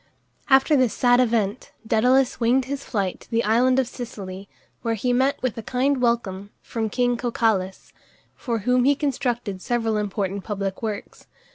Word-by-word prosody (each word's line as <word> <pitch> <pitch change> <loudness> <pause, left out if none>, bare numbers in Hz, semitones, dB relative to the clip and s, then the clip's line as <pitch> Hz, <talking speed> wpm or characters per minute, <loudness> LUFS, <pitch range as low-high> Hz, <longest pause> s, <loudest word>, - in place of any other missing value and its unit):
After 270 +3 +5
this 255 -6 +2
sad 245 0 +4
event, 225 -2 0
Dædalus 250 +4 +3
winged 245 +2 +2
his 275 +1 -4
flight 195 -5 -2
to - - -18
the 230 0 +1
island 245 +4 +3
of 265 -2 +2
Sicily, 200 -6 -8 0.3
where 230 -1 -1
he 245 +4 0
met 265 +3 +2
with 255 -4 -1
a - - -4
kind 255 +4 0
welcome 205 -5 -1
from 225 -2 -3
king 245 +2 +1
Cocalus, 220 -6 -1 0.4
for 235 -3 -2
whom 250 0 +3
he 285 +1 +4
constructed 245 -8 -2
several 225 -2 0
important 200 -1 -2
public 195 -2 -4
works. 215 -3 -6
235 Hz, 160 wpm, -23 LUFS, 205-255 Hz, 0.4 s, After